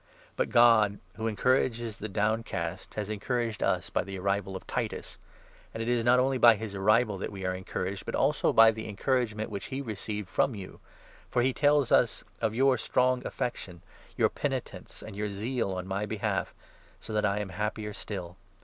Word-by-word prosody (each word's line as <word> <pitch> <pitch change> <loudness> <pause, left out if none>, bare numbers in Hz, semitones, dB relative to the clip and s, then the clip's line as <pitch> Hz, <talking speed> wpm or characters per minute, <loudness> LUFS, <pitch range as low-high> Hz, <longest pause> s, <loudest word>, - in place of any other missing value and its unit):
But - - 0
God, 110 -4 +5 0.2
who 110 +1 -3
encourages 115 0 +1
the - - -5
6 100 - -13
downcast, 100 -5 -2
has 105 0 -3
encouraged 115 +1 -2
us - - 0
by - - +1
the 95 0 -6
arrival 100 0 -1
of 95 - -7
Titus. - - -4 0.6
And 115 - -2
it - - -4
7 120 +1 +2
is - - -2
not 125 +2 +5
only 130 0 +1
by 120 -2 +8
his 105 -1 -6
arrival 105 +1 +2
that - - -4
we 95 -2 -6
are 90 - 0
encouraged, 95 +1 -4
but - - -2
also - - +2
by 115 0 +7
the 110 0 -6
encouragement 110 0 -1
which 100 -2 -4
he 135 - -4
received 105 -4 -4
from 115 +8 +1
you; 95 -2 -9 0.5
for 120 - +2
he 130 +1 +2
tells 145 -2 +3
us - - +3 0.2
of 110 -1 0
your 130 0 +3
strong 125 +2 +2
affection, 90 -8 -4 0.3
your - - +4
penitence, - - -4
and - - -9
your 105 +1 -2
zeal 110 +2 -2
on 90 0 -4
my 100 +2 -2
behalf 110 -2 -2 0.2
— - - -29
so 110 - -8
that 105 - +1
I 100 -1 +1
am 105 -2 -3
happier 105 +2 -3
still. 90 -4 -6
105 Hz, 195 wpm, -29 LUFS, 100-120 Hz, 0.6 s, by